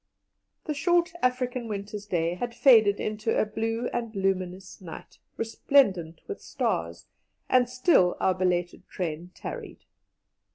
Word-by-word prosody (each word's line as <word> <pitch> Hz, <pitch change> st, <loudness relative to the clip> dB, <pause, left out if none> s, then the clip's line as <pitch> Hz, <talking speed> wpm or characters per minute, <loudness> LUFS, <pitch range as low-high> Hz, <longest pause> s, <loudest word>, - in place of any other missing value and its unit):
The 305 Hz, -, -2 dB
short 345 Hz, +4 st, +2 dB
African 250 Hz, -1 st, 0 dB
winter's 205 Hz, 0 st, -6 dB
day 170 Hz, -3 st, 0 dB
had 235 Hz, +6 st, -5 dB
faded 225 Hz, -5 st, +6 dB
into 215 Hz, +1 st, -1 dB
a -, -, +3 dB
blue 225 Hz, +2 st, -2 dB
and 230 Hz, -2 st, -3 dB
luminous 190 Hz, -1 st, -2 dB
night, 170 Hz, -3 st, -10 dB, 0.2 s
resplendent 200 Hz, -, +2 dB
with -, -, -6 dB
stars, 85 Hz, 0 st, -2 dB, 0.4 s
and 250 Hz, -1 st, +3 dB
still 250 Hz, -, +3 dB
our 190 Hz, -, +3 dB
belated 180 Hz, -1 st, -1 dB
train 170 Hz, -1 st, -4 dB
tarried. -, -, -8 dB
210 Hz, 125 wpm, -27 LUFS, 180-245 Hz, 0.4 s, faded